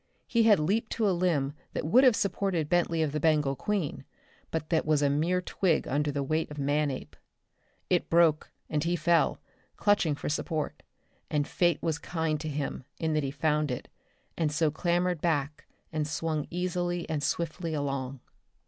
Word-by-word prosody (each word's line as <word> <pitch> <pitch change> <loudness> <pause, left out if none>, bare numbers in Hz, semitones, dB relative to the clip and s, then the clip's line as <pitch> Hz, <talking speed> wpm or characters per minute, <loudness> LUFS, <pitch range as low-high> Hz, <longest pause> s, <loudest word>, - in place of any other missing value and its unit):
He 230 - +2
had 215 -2 +7
leaped 205 +9 0
to 220 -2 +1
a - - +3
limb 165 -6 +1 0.2
that - - -2
would 240 - +5
have 255 -4 +6
supported 185 -5 0
Bentley 170 -2 +2
of 150 - -1
the 150 - -1
Bengal 150 -3 +2
Queen, 195 0 -2 0.5
but 160 -1 -3
that 160 - +3
was 150 -1 +2
a 140 - +3
mere 170 +6 +1
twig 180 -3 +1
under 145 +2 0
the 140 0 -2
weight 155 +4 -1
of 150 - -9
Manape. 145 -1 -1 0.7
It - - +1
broke 165 -2 +4 0.2
and 150 -1 -1
he 170 +1 +1
fell, 170 -1 +2 0.4
clutching 205 -8 +2
for - - -6
support; 155 +1 -2 0.5
and 145 -1 0
fate 175 -1 +1
was 160 -2 0
kind 160 -3 -1
to 155 - -3
him 140 -2 -3
in 160 -1 -1
that 155 - +2
he 140 - -2
found 150 +1 0
it, 125 - -4 0.5
and 160 -3 0
so 155 0 +2
clambered 175 +1 0
back 150 -3 -1 0.3
and 155 -1 -1
swung 155 0 -2
easily 175 -1 -2
and 155 -2 -2
swiftly 165 +2 -2
along. 135 -2 -3
155 Hz, 175 wpm, -29 LUFS, 150-175 Hz, 0.7 s, had